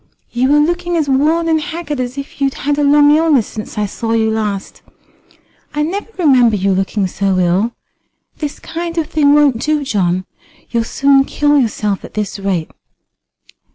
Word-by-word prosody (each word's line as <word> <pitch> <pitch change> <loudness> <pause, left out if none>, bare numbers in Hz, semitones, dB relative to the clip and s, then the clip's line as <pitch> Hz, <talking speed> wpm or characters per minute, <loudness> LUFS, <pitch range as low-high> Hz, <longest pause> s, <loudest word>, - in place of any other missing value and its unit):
You 255 +3 +1
are - - +5
looking 345 +3 0
as 310 -3 0
worn 305 +5 +2
and 320 -1 +2
haggard 320 -4 -5
as 250 +1 -4
if 275 0 -8
you'd 275 -1 +1
had 290 +2 -1
a - - +2
long 290 +1 +5
illness 305 -7 +3
since 215 -1 -8
I 210 - +1
saw 225 +3 -3
you 220 -1 +1
last. 210 -3 -3 0.9
I 300 - +1
never 390 +8 -4
remember 255 - +4
you 195 0 0
looking 195 +2 0
so 190 +1 -1
ill. 185 +6 +1 0.6
This 295 -2 -4
kind 335 0 -6
of 325 - +1
thing 290 -2 +3
won't 285 -6 +3
do, 305 -1 0
John. 185 -7 0 0.5
You'd 230 -1 0
soon 275 0 +3
kill 290 +1 +1
yourself 210 -5 -1
at - - -11
this 210 -1 -3
rate." 190 -5 -2
270 Hz, 175 wpm, -16 LUFS, 210-300 Hz, 0.9 s, are